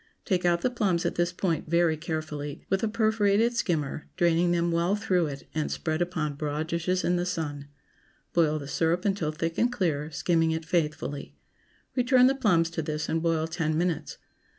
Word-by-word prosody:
Take 180 -4 0
out 170 -1 +3
the 250 - +1
plums 195 -8 0
at - - +1
this 175 0 0
point, 170 -4 -2
very 170 -1 +3
carefully, 155 -2 -5
with 195 0 +2
a 225 - +1
perforated 220 0 +2
skimmer, 155 - -1
draining 175 0 +3
them 170 0 +1
well 170 +4 +2
through 185 -5 +1
it, 140 -1 -7
and 155 -1 -1
spread 155 0 -2
upon 160 -4 -1
broad 150 +1 -2
dishes 180 +2 0
in 175 +1 +2
the 175 - 0
sun. 145 -5 -3 0.7
Boil 155 -3 +3
the 140 -2 -7
syrup 165 +5 0
until 190 -6 0
thick 165 +1 -3
and 240 +1 +3
clear, 160 -9 -1
skimming 165 +1 +1
it 160 0 -2
faithfully. 155 -4 -2 0.6
Return 250 0 +5
the 265 - +5
plums 180 -11 +2
to 165 - -2
this, 150 0 -3
and 165 - 0
boil 165 -1 +1
ten 160 -1 -1
minutes. 165 -3 -1
170 Hz, 185 wpm, -27 LUFS, 155-185 Hz, 0.7 s, Return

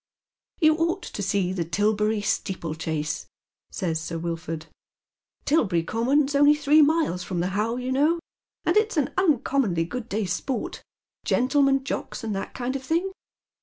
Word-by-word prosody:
"You 310 -2 +5
ought 340 +3 0
to - - -6
see 190 -2 0
Tilberry 210 +5 +1
steeplechase," 160 -5 -2 0.4
says 165 -5 -2
Sir 165 +1 -4
Wilford. 165 -1 -4 0.4
" - - -50
Tilberry 200 - +2
Common's 270 - +1
only 290 +1 +6
three 300 +1 +5
miles 300 - +2
from 180 -1 -3
the 180 +2 0
How, 210 +4 0
you 250 +1 -3
know, 300 +6 +3 0.5
and - - +2
it's 430 -3 +2
an 290 - +1
uncommonly 270 - +2
good 235 +7 -6
day's 195 -3 -1
sport, 265 +4 -3 0.4
gentlemen 270 +1 +2
jocks, 265 - -4
and 215 -3 -2
that 195 - -5
kind 255 +1 -2
of 270 - -4
thing. 335 +7 0
235 Hz, 150 wpm, -25 LUFS, 180-290 Hz, 0.5 s, only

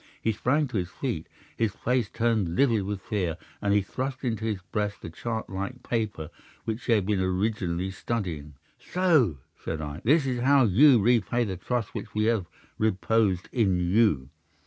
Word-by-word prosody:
He 110 - +1
sprang 130 +7 +1
to 115 - -2
his 90 -2 -2
feet, - - -4 0.3
his 110 -3 0
face 125 -4 0
turned 110 -7 0
livid 115 -2 +3
with 100 -1 -4
fear, 90 -7 -2 0.2
and 100 - +1
he 100 -1 +3
thrust 130 +6 -4
into 110 -3 -1
his 105 -4 -1
breast 105 -1 -2
the 80 - -6
chart 110 +5 -4
like 100 +6 -5
paper 105 -9 -2 0.3
which 110 +2 -3
he 120 - +3
had 105 -4 +2
been 105 -1 +1
originally 95 -1 -1
studying. 85 -9 -4 0.2
"'"So!" 160 - +2 0.3
said 80 - -3
I. 75 +2 -6
"This 145 +5 +4
is 125 -2 -1
how 135 +1 +5
you 120 +5 +6
repay 120 +2 +2
the 100 -4 -3
trust 115 +4 -3
which - - -7
we 105 - +2
have 110 -5 +1 0.3
reposed 105 -2 +1
in 100 -7 +2
you. 90 - +2
110 Hz, 175 wpm, -27 LUFS, 95-120 Hz, 0.3 s, you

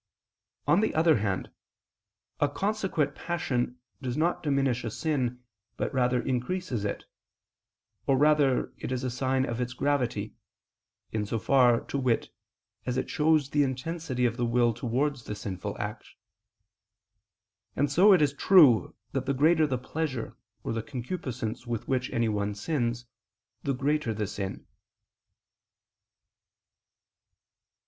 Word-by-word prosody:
On - - +4
the 220 - 0
other 160 -2 +5
hand, 100 -3 -2 0.9
a 145 - +3
consequent 190 -4 -1
passion 125 -8 -2 0.2
does 125 -1 -3
not 170 +3 +1
diminish 135 -5 +1
a 115 - -2
sin, 125 -2 -2 0.3
but - - -2 0.3
increases 130 - -2
it; 100 - -3 1.0
or 135 - +4
rather 145 -2 +3
it - - -5
is 130 0 -2
a 130 - -1
sign 130 +1 0
of 115 0 -3
its 125 +1 -2
gravity, 125 -7 -1 0.8
in 110 -1 -1
so 115 - -1
far, 120 0 +4
to 140 - -4
wit, 125 -3 0 0.5
as 125 0 -2
it - - -2
shows 150 -2 +2
the 145 - +3
intensity 135 0 -1
of 120 0 0
the 120 - 0
will 120 0 +3
towards 125 +3 -1
the 105 - -4
sinful 95 -3 -5
act; - - -4 1.7
and 145 -1 +1
so 185 +8 +6
it 180 -6 +6
is 140 -1 +2
true 145 - +5 0.2
that 135 -1 -2
the 140 - +1
greater 155 +3 +4
the 130 -3 -1
pleasure 130 -1 -4 0.3
or - - -2
the 115 - -1
concupiscence 125 -2 -5
with 115 -2 -3
which 130 -1 0
anyone 105 -3 0
sins, 120 0 -1 0.6
the 140 - -1
greater 140 -3 0
the 105 0 -1
sin. 100 -1 -5
130 Hz, 135 wpm, -28 LUFS, 120-150 Hz, 1.7 s, so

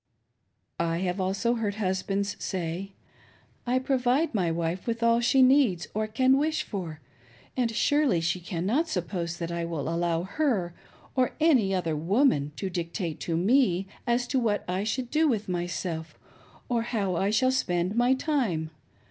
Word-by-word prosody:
I 165 0 0
have 185 +1 -1
also 195 +5 0
heard 215 -4 -2
husbands 200 0 -1
say: 185 +1 -3 0.4
" - - -29 0.3
I 250 +1 +2
provide 260 +3 +1
my 185 -6 +1
wife 165 +4 -2
with 230 0 -1
all 230 0 +4
she 260 +2 +4
needs 255 -10 +4
or 215 +1 -1
can 260 +5 +3
wish 310 +2 0
for, 165 -6 -6 0.5
and 245 -3 +1
surely 260 - +2
she 170 +2 0
cannot 195 - -1
suppose 170 - -3
that 170 0 -4
I 170 0 -2
will 165 -4 -3
allow 170 0 0
her 195 - 0 0.4
or 255 -2 +2
any 265 -12 +4
other 165 -4 -1
woman 165 - +2
to 195 - -3
dictate 170 -1 -3
to 165 -1 -2
me 195 -1 +3 0.2
as 240 +1 +2
to 265 - +2
what 215 -4 0
I 185 +2 -1
shall 245 +4 -1
do 310 +6 +2
with 220 -7 0
myself 175 -2 -3 0.5
or 240 -2 +1
how 210 -6 -1
I 195 +4 +1
shall 255 +5 +3
spend 180 -7 0
my 245 +2 +4
time. 230 - -1
200 Hz, 165 wpm, -27 LUFS, 175-245 Hz, 0.5 s, all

